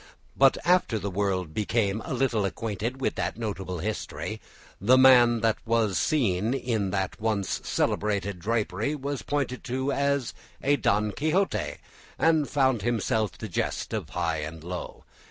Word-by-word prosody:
But 135 0 +5
after 175 -10 +3
the 100 -1 -4
world 95 -4 -1
became 110 0 0
a - - -7
little 120 -5 +1
acquainted 115 +5 -3
with 135 - 0
that 90 +3 -2
notable 95 -5 -4
history, 105 +6 -4 0.4
the 125 +6 +5
man 120 -3 +6
that 115 -1 +2
was 115 -4 +1
seen 115 -5 +1
in 110 -7 -1
that 95 +2 -2
once 105 -3 -1
celebrated 100 -3 -1
drapery 110 - -1
was 140 -1 -4
pointed 135 -3 -3
at 130 +2 -1
as 140 -3 0 0.3
a 145 +1 +3
Don 105 -2 +1
Quixote, 160 - 0 0.4
and 160 -3 +3
found 130 -5 +2
himself 110 -1 0
the 110 - -6
jest 90 - -2
of - - -3
high 85 -2 -1
and 80 +1 -6
low. 90 +1 -6
110 Hz, 150 wpm, -27 LUFS, 100-130 Hz, 0.4 s, man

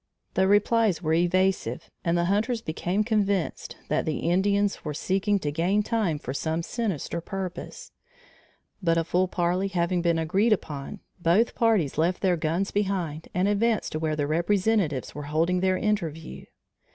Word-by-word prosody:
The 190 0 +3
replies 205 -2 +3
were 160 0 +1
evasive 175 -6 +1
and 170 0 +1
the 170 - +1
hunters 220 +5 0
became 175 +6 -1
convinced 200 -5 -1
that 150 - 0
the 155 - -2
Indians 200 +2 +1
were 150 -2 -4
seeking 195 +5 +1
to 150 -6 -2
gain 180 +7 +1
time 205 -9 0
for 130 -3 -6
some 160 +3 -2
sinister 185 - -3
purpose; 195 - -6 0.9
but 165 -2 +2
a 165 - +2
full 180 +3 +1
parley 180 +2 0
having 175 -1 0
been 170 -1 +2
agreed 195 +8 +2
upon, 150 0 -5 0.2
both 180 +8 +3
parties 210 - +1
left 175 +4 +1
their 185 -2 +3
guns 170 +4 -1
behind 185 -6 -2
and 180 +2 +2
advanced 215 +2 +1
to 155 - -3
where 155 -1 -1
their 145 -1 -1
representatives 175 - +1
were 145 -1 -6
holding 165 +4 +1
their 185 0 +2
interview. 170 -8 -3
180 Hz, 160 wpm, -26 LUFS, 160-205 Hz, 0.9 s, The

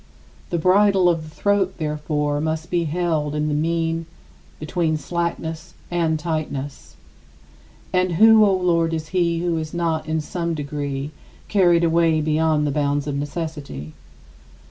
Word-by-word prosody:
The 170 - -1
bridle 190 +2 +4
of 170 -2 +2
the 155 - -10
throat, 195 +3 0
therefore, 150 -1 -1
must 160 +1 -3
be 175 -1 +1
held 155 -2 -1
in 150 0 0
the - - 0
mean 165 +1 -1 0.5
between 155 0 -1
slackness 170 +1 -4 0.2
and 165 -2 +1
tightness. 150 -4 -4 1.0
And 185 -1 +2
who, 220 +4 +7
O 205 - +4
Lord, 170 -3 +1
is 155 -1 -5
he 170 -2 +1
who 170 -2 0
is 155 +1 -6
not 165 -2 -1
in 160 0 0
some 170 +2 -3
degree 145 -1 -4 0.4
carried 175 -4 +4
away 165 -1 +3
beyond 155 0 +1
the 145 - 0
bounds 145 0 0
of 145 - -3
necessity? 145 - -5
160 Hz, 145 wpm, -22 LUFS, 150-175 Hz, 1.0 s, who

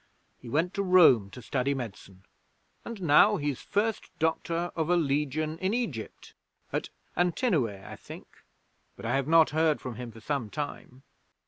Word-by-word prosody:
He 120 - -10
went 165 - 0
to 200 - -1
Rome 165 - +6
to 120 +5 -11
study 140 0 0
medicine, 100 -6 -8 0.6
and 225 -5 -7
now 185 +7 +6
he's 145 -4 -2
First 215 +2 -1
Doctor 165 +2 -1
of 160 -1 -1
a 180 - +4
Legion 155 0 0
in 190 +4 0
Egypt 155 - -5 0.4
at - - -2 0.3
Antinoe, 175 - +2 0.2
I - - -8
think, - - -11 0.7
but - - -10
I - - 0
have 135 0 0
not 165 0 +5
heard 155 0 +2
from 125 -3 -7
him 120 -2 -6
for 115 - -13
some 130 -2 -3
time. 135 -1 -6
155 Hz, 160 wpm, -28 LUFS, 130-175 Hz, 0.7 s, Rome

